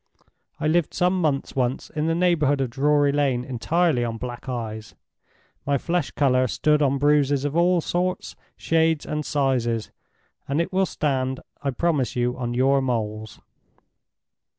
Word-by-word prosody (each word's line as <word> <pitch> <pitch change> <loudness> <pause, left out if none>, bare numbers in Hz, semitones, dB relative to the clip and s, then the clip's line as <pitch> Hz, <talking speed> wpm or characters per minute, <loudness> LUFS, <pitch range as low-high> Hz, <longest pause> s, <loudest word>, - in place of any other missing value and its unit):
I - - -3
lived 165 0 +1
some 180 +1 +1
months 145 -4 -1
once 130 -1 -1
in 155 +1 -2
the 165 - +1
neighborhood 160 -5 +2
of 130 -3 -1
Drury 145 +2 +2
Lane 135 -4 0
entirely 140 +2 +1
on 115 -1 -3
Black 125 +1 -7
Eyes. 110 -3 -5 0.7
My 140 0 +1
flesh 175 +6 -1
color 130 -2 +2
stood 150 +5 +1
on 140 -1 +2
bruises 145 -1 +2
of 145 +1 -2
all 175 +1 +3
sorts, 180 +3 -2 0.2
shades, 160 -1 +1
and 150 0 -3
sizes, 125 -6 -1 0.6
and 140 +3 0
it 170 +3 -2
will 190 0 +2
stand, 130 -3 -1 0.2
I 140 - -1
promise 140 -1 0
you, 125 0 0
on 120 -1 -4
your 135 +2 +3
moles." 110 -4 -3
140 Hz, 150 wpm, -24 LUFS, 125-160 Hz, 0.7 s, all